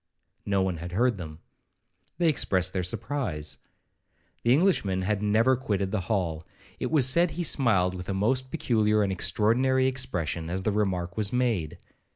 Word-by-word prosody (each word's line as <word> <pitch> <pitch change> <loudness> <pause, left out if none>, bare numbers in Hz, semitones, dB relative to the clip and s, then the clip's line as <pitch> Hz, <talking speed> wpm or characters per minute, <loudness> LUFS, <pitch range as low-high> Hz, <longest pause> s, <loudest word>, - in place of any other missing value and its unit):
No 100 -1 +2
one 95 -3 -2
had 85 +2 -7
heard 120 +1 +1
them. 80 -2 -8 0.8
They 175 - +2
expressed 95 - +1
their 95 - -1
surprise. 90 - -3 0.8
The 120 - +2
Englishman 125 - +2
had 105 +1 -1
never 110 +5 +3
quitted 100 -6 -2
the 105 - 0
hall; 85 -7 -1 0.4
it - - -2
was 145 -5 +4
said 170 +6 +4
he 175 +2 -4
smiled 105 - +2
with 90 0 -7
a - - 0
most 130 +6 0
particular 110 -8 +1
and 100 - -1
extraordinary 125 +7 +2
expression 95 -11 -2
as 95 +2 -2
the 105 - +1
remark 95 -3 -1
was 105 -2 0
made. 115 -11 -1
105 Hz, 165 wpm, -27 LUFS, 90-130 Hz, 0.8 s, was